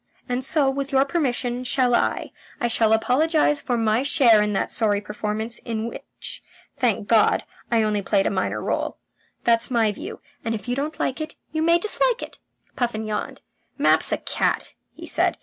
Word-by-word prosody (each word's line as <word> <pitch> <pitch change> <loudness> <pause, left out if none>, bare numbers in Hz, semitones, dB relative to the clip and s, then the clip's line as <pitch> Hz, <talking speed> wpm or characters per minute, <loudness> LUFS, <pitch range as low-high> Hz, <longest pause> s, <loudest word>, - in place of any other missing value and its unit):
And 250 +1 -2
so, 280 +1 +2
with 275 +1 -2
your 270 0 +4
permission, 255 -5 -1
shall 250 -1 +2
I. - - 0 0.3
I 240 - +1
shall 225 -1 +2
apologize 295 +6 +3
for 245 -2 -1
my 225 +1 +2
share 250 -6 +5
in 210 0 0
that 195 - -1
sorry 210 -3 +1
performance, 210 +2 -4
in 225 -1 -4
which, 235 - -7 0.3
thank 225 -5 0
God, 220 -1 +4 0.3
I 230 -2 +3
only 210 -1 0
played 195 0 +1
a - - +1
minor 190 - -1
role. - - -2 0.5
That's 230 0 +3
my 230 -4 +2
view, 205 - -8 0.2
and 225 -2 -1
if 215 - -8
you 245 - 0
don't 300 +3 -3
like 265 - -1
it, 310 0 -6 0.2
you 315 - -1
may 335 +1 +5
dislike 465 +6 +1
it." - - -10 0.4
Puffin 235 -3 -1
yawned. 215 -1 -4 0.4
"Mapp's - - +4
a - - +1
cat," - - -1 0.2
he - - -9
said. - - +1
240 Hz, 185 wpm, -23 LUFS, 220-275 Hz, 0.5 s, share